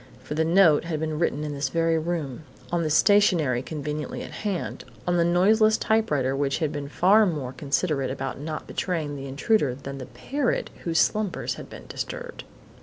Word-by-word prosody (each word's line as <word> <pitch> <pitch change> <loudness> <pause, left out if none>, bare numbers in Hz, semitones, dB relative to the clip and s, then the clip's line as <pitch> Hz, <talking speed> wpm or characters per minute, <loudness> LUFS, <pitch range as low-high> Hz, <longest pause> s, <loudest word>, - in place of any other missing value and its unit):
For 150 - -5
the 160 +1 +1
note 165 -2 +5
had 160 -2 -2
been 155 -1 -2
written 150 -3 0
in 150 -1 -3
this 140 -1 -2
very 165 +1 +2
room, 160 -5 -3 0.3
on 170 -2 0
stationery 165 - +4
conveniently 150 +1 -4
at - - -8
hand, 200 -4 -4 0.2
on 175 0 +1
the 170 - +4
noiseless 215 +6 +4
typewriter 150 -12 +1
which 140 0 0
had 155 -3 -1
been 145 -1 -5
far 200 +7 +5
more 140 -7 -3
considerate 140 -1 -1
about 135 0 -4
not 155 +1 -5
betraying 160 -6 -2
the 135 0 -6
intruder 140 - +1
than 140 0 -7
had 130 - -7
the - - -20
parrot 280 -2 -1
whose 165 -2 0
slumbers 210 +1 +1
had - - -10
been - - -11
disturbed. - - -6
160 Hz, 180 wpm, -25 LUFS, 140-180 Hz, 0.3 s, note